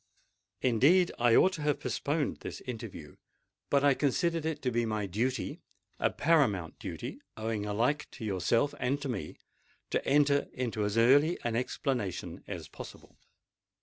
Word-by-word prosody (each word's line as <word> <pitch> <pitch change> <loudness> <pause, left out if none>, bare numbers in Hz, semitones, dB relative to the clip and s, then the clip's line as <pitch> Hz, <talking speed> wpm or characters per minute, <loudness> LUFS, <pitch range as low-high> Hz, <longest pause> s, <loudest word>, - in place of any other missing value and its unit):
Indeed, 145 +10 +4
I 120 -1 +5
ought 190 - +5
to 165 - -5
have 150 0 +1
postponed 145 0 -1
this - - -7
interview: 110 - -8 0.5
but 140 -1 +3
I 145 -1 +6
considered 160 +4 0
it 150 -3 -3
to 125 - +1
be 120 0 +1
my 110 -2 -1
duty—a 115 +8 -3
paramount 115 - +1
duty - - -6 0.2
owing 110 -1 -2
alike 120 +8 0
to 110 - -7
yourself 110 +7 +1
and 135 +3 0
to - - -2
me—to 95 -11 -6
enter 140 0 +3
into 115 -4 -2
as 105 +2 -1
early 145 +8 +5
an 120 -1 -1
explanation 125 - -2
as - - -6
possible." - - -12
125 Hz, 145 wpm, -30 LUFS, 110-145 Hz, 0.5 s, I